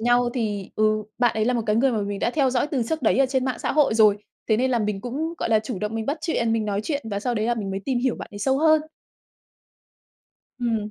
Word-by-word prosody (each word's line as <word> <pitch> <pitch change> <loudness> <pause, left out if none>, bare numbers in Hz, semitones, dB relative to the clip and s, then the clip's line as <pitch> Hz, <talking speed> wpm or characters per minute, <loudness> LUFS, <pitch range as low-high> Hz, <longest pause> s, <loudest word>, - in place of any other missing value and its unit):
nhau 240 +1 +3
thì 210 -5 -2
ừ, 215 0 +2 0.2
bạn 240 -2 +2
ấy 215 - +1
là 250 - +2
một 230 - 0
cái 210 0 +2
người 265 +3 +3
mà 220 - 0
mình 200 0 -3
đã - - 0
theo 270 0 +2
dõi 250 +2 +1
từ 280 -5 -1
trước 320 0 -2
đấy - - +3
ở 270 - +5
trên 260 -1 0
mạng 260 -1 -2
xã - - -2
hội 290 -6 +3
rồi, 215 -2 +5 0.3
thế 215 - +4
nên 260 +2 +1
là 240 - +2
mình 210 -2 -2
cũng, 300 +9 -3
gọi - - -2
là, 220 - +4
chủ 215 -2 -5
động 210 +1 -3
mình 225 -1 -3
bắt 285 +4 -1
chuyện, 235 -9 0
mình 225 -1 0
nói 205 -1 -1
chuyện 290 +3 -2
và 200 0 -2
sau 245 +2 -1
đấy 215 0 0
là 240 - +1
mình 200 -4 -4
mới 195 - -3
tìm 260 -3 0
hiểu 255 -1 0
bạn - - -8
ấy - - -6
sâu 265 +6 +1
hơn. 315 0 +4 1.8
Ừm. 225 -4 -1
235 Hz, 280 wpm, -24 LUFS, 215-260 Hz, 1.8 s, ở